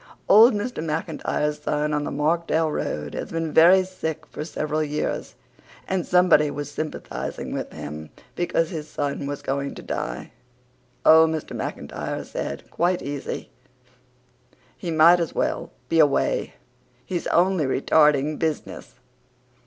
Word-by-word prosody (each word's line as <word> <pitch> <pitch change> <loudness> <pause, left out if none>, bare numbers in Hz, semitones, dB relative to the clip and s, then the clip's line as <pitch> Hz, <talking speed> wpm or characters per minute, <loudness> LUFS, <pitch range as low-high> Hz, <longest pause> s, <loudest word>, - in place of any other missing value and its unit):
Old 220 +3 +7
Mr. 205 -5 -3
McIntyre's 150 -1 -2
son 150 0 -1
on 150 0 0
the - - -3
Markdale 160 +1 +1
Road 75 - -3
had - - -5
been 165 -1 -3
very 180 +4 +7
sick 160 -4 -5
for - - -7
several 155 -1 -2
years 150 0 -3 0.5
and 190 -2 -1
somebody 180 -5 +5
was 145 0 -5
sympathizing 155 +1 -5
with - - -4
him 75 +1 -7 0.2
because 165 -2 0
his 155 -3 -5
son 140 -1 -3
was 145 0 -5
going 140 +1 -2
to - - -9
die. - - -4 0.7
"Oh," 160 +1 +8
Mr. 160 -1 -4
McIntyre - - -5
said, - - -5
quite 175 +2 0
easy, 140 0 -5 1.2
"he 175 - -6
might 165 +2 +6
as 170 - -3
weel - - -1 0.2
be 165 - +2
awa'. 145 -2 +2 0.6
He's 175 -2 -3
only 180 -2 +2
retarding 150 +2 +3
buzziness." 160 -2 -4
155 Hz, 135 wpm, -24 LUFS, 150-170 Hz, 1.2 s, Oh